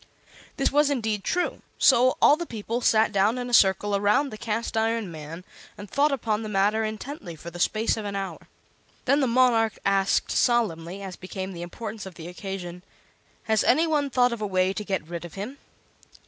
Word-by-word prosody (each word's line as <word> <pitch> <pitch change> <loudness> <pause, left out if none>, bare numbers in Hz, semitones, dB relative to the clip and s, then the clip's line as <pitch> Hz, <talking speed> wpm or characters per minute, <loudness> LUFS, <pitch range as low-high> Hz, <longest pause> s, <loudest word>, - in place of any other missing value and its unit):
This 275 - +1
was 295 +1 +3
indeed 220 -7 -1
true; 360 +1 -1 0.2
so 255 0 +5
all 290 - +7
the 345 +1 -6
people 230 +2 -4
sat 220 -2 +3
down 205 +4 +2
in 245 0 -4
a - - -6
circle 200 -1 +4
around 210 +8 +2
the - - -6
Cast 225 +1 -3
iron 225 -3 0
Man 160 +2 -8 0.3
and 205 - -9
thought 285 +8 +2
upon 225 -5 -1
the 215 - -5
matter 210 +2 +2
intently 215 - -6
for 170 +2 -9
the 175 - -9
space 215 +5 +1
of 220 - -4
an 200 -1 -4
hour. 195 -1 -5 0.6
Then 280 - +3
the 270 - +2
monarch 230 -3 +3
asked, 195 0 +2
solemnly, 200 -7 0
as 190 -2 -6
became 190 +1 -6
the 170 - -7
importance 210 +3 -7
of 185 - -11
the 165 -1 -9
occasion: 180 -1 -7 0.6
"Has 220 -1 +2
any 315 +6 +4
one 295 -3 0
thought 250 -1 +3
of 230 - -6
a 210 - -1
way 185 0 +1
to 210 - -4
get 190 -6 -3
rid 170 0 -6
of 175 - -10
him?" 215 +8 -6
215 Hz, 200 wpm, -25 LUFS, 190-240 Hz, 0.6 s, all